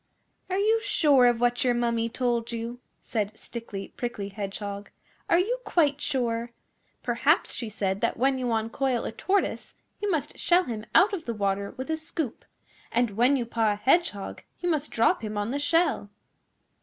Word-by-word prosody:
'Are 375 - 0
you 440 +3 +3
sure 290 -10 +5
of 240 -1 +2
what 245 0 +2
your 245 -2 +2
Mummy 235 -1 0
told 240 -1 -1
you?' 235 +1 -4 0.2
said 215 -1 -2
Stickly 220 -4 -7
Prickly 225 -5 -4
Hedgehog. 200 0 -5 0.4
'Are - - +5
you 455 +8 +1
quite 295 - +2
sure? 235 -4 -1 0.5
Perhaps - - +2
she 230 - -2
said 195 -2 -2
that - - 0
when 265 +2 +2
you 250 -2 -1
uncoil 230 +3 0
a - - -3
Tortoise 385 - -1 0.3
you 415 - 0
must 320 -6 -2
shell 355 +1 +4
him 225 -6 -5
out 405 +4 +7 0.2
the 235 - -2
water 200 -1 -1
with 260 +5 -4
a 315 - 0
scoop, 315 -5 -4 0.5
and 240 -1 +2
when 245 +7 +3
you 245 - -1
paw 225 -2 +1
a - - -4
Hedgehog 255 - +1 0.2
you 355 - -1
must 305 -2 -1
drop 230 0 +2
him 215 -1 -4
on 205 +3 -1
the 285 - -1
shell. 290 -7 +1
240 Hz, 175 wpm, -27 LUFS, 220-290 Hz, 0.5 s, out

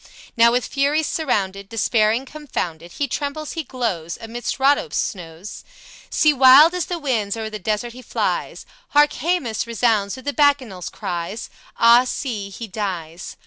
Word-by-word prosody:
Now 235 -1 +6
with 245 -1 +1
furies 290 +3 +1
surrounded, 200 -11 -2
Despairing, 225 +2 +1
confounded, 175 - -5
He 285 - -2
trembles, 290 +3 -4
he 325 - -3
glows, 215 - -3
Amidst 235 +3 -5
Rhodope's 270 - +2
snows 175 +1 -5 0.5
See, 305 -1 +3
wild 275 +5 +8
as 360 -2 -2
the 355 - -3
winds 230 -9 -1
o'er 220 -1 -4
the 215 - -6
desert 215 +4 -2
he 255 - -11
flies; - - -2 0.3
Hark! 295 0 +6
Haemus 265 -8 -1
resounds 225 -3 +1
with 260 - -12
the 285 - -1
Bacchanals' 265 - +1
cries; 175 +5 -5 0.3
Ah, 235 +2 +6
see, 230 -6 -4
he 215 +4 -7
dies! 180 -5 -5
235 Hz, 150 wpm, -21 LUFS, 200-280 Hz, 0.5 s, wild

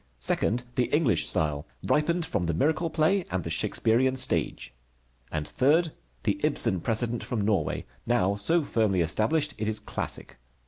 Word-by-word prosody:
Second, 115 - +1
the 125 - +1
English 125 - +2
style, 75 -2 0 0.2
ripened 170 +3 +1
from 105 - -1
the 85 -2 -1
miracle 160 - +1
play 160 +5 +2
and 95 -2 -2
the 85 - -5
Shakespearian 115 +8 +2
stage. 125 - -2 0.6
And 75 -1 -3
third, 155 +5 +2 0.3
the - - 0
Ibsen 90 - +2
precedent 115 +2 -1
from 120 -4 -2
Norway, 100 -6 0 0.2
now 115 -5 +2
so 155 +12 +2
firmly 110 -8 +1
established 140 - 0
it 105 - -1
is 110 0 -1
classic. - - -5
115 Hz, 150 wpm, -27 LUFS, 95-150 Hz, 0.6 s, English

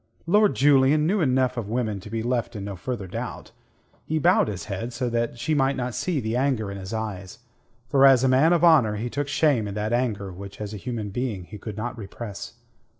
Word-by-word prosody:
Lord 205 +4 +4
Julian 140 +2 +4
knew 195 +4 +1
enough 130 -3 +1
of 110 -4 -4
women 110 -4 -1
to 100 - -11
be 115 +1 -3
left 120 -1 -1
in 100 -1 -5
no 100 -1 -5
further 110 +2 -4
doubt. 90 - -6 0.5
He 160 - -2
bowed 175 - +4
his 100 -4 -5
head 115 +4 -5
so 120 0 -2
that 115 0 -1
she 120 +7 -1
might 135 -1 +2
not 125 -1 -3
see 175 +2 -1
the 110 -1 -2
anger 125 -6 0
in 100 - -6
his 95 0 -7
eyes, 105 -4 -5 0.5
for 135 -1 +6
as 130 -2 +5
a - - +4
man 135 +6 +4
of 175 -1 +3
honour 140 -11 +5
he 115 +3 -4
took 145 0 -2
shame 145 -7 +2
in 100 - -6
that 105 +2 -2
anger 110 -6 -1
which 100 +2 -10
as 105 0 -5
a - - -5
human 110 -2 -5
being 110 -4 -3
he 105 +4 -11
could 110 -1 -7
not 120 +3 -4
repress. 100 0 -7
120 Hz, 225 wpm, -25 LUFS, 105-135 Hz, 0.5 s, for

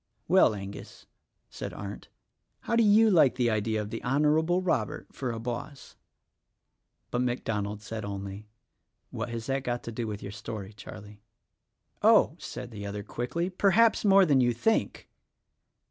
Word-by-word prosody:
"Well, 180 - +5
Angus," 100 0 -9 0.5
said - - -6
Arndt, 100 0 -7 0.5
"how 230 - -1
do 230 - +5
you 215 +1 +5
like 145 -8 +5
the 120 -2 +1
idea 110 0 0
of 105 0 -5
the 115 - -4
Honorable 155 +7 +2
Robert 145 - -2
for 130 -3 -3
a 115 - -5
boss?" 120 +4 -6 1.2
But 120 - 0
MacDonald 105 -4 -2
said 110 0 -5
only, 100 +1 -6 0.6
"What 115 +2 -4
has 115 -1 -5
that 135 +1 -1
got 120 -1 -2
to 115 - -6
do 115 0 -4
with 105 -1 -5
your 100 - -6
story, 110 -1 -7
Charlie?" 105 0 -11 0.8
"Oh!" - - +5
said 125 -1 -7
the 105 -2 -7
other 100 0 -5
quickly, 165 - -3
"perhaps 205 +5 +3
more 195 -2 +6
than 140 -5 +4
you 120 -1 +3
think." 220 - 0
120 Hz, 155 wpm, -28 LUFS, 105-155 Hz, 1.2 s, more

